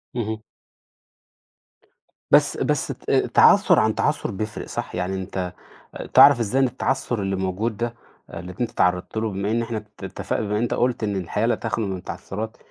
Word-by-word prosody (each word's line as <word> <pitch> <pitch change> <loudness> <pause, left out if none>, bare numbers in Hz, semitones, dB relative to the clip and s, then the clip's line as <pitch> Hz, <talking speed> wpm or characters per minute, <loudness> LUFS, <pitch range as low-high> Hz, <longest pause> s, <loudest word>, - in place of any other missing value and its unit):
اهم. 110 -2 -3 1.9
بس - - +5
بس - - 0
ت - - -5
تعثر - - +5
عن - - +2
تعثر - - 0
بيفرق 105 +2 -5
صح؟ - - -5
يعني 90 +2 -2
أنت 95 -1 -4 0.6
تعرف 120 - +8
إزاي 125 +5 +1
إن - - +5
التعثر 125 -2 -1
اللي 95 0 -1
موجود 95 +4 -2
ده 120 +1 -3 0.4
اللي 90 +1 -8
أنت 120 - 0
تعرضت 90 +3 0
له، 110 0 0
بما 100 +1 -2
إن 115 +1 +1
إحنا 115 -1 -3
ات 105 - -12 0.2
اتفقنا 110 - -3
بما 105 +1 0
أنت 120 +1 0
قلت 125 -2 0
إن 100 -1 -1
الحياة 100 +4 -1
لا 120 - +3
تخلو 110 -1 -2
من 95 -1 -3
التعثرات، 105 +4 -6
105 Hz, 170 wpm, -23 LUFS, 95-115 Hz, 1.9 s, تعرف